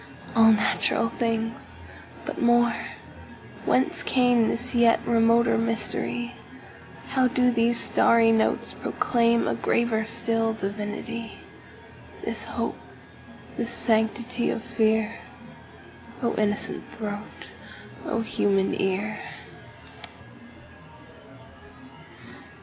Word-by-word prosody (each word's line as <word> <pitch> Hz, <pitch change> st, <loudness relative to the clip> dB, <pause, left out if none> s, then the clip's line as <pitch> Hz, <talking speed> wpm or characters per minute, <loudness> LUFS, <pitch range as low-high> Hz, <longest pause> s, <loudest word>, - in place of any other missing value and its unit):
All 225 Hz, -1 st, +6 dB
natural 220 Hz, +1 st, +1 dB
things! 230 Hz, -1 st, -4 dB, 0.5 s
But -, -, -6 dB
more—Whence 240 Hz, +2 st, -1 dB
cameThis 245 Hz, -1 st, +1 dB
yet 235 Hz, -1 st, +4 dB
remoter 230 Hz, 0 st, +3 dB
mystery? 230 Hz, +1 st, -2 dB, 0.8 s
How 260 Hz, -1 st, +2 dB
do 250 Hz, 0 st, +2 dB
these 235 Hz, 0 st, +4 dB
starry 230 Hz, -1 st, +5 dB
notes 225 Hz, -1 st, +1 dB
proclaimA 235 Hz, -, 0 dB
graver 220 Hz, -, 0 dB
still 225 Hz, 0 st, +2 dB
divinity? 215 Hz, +3 st, -6 dB, 0.9 s
This -, -, -1 dB
hope, -, -, -4 dB, 0.8 s
this -, -, -2 dB
sanctity 235 Hz, +2 st, +1 dB
of 225 Hz, -, -3 dB
fear?O 220 Hz, +2 st, -4 dB
innocent 210 Hz, -1 st, +1 dB
throat! 205 Hz, -2 st, -8 dB, 0.5 s
O 230 Hz, -, -2 dB
human 195 Hz, -3 st, 0 dB
ear! 200 Hz, +3 st, -2 dB
230 Hz, 75 wpm, -24 LUFS, 220-235 Hz, 0.9 s, All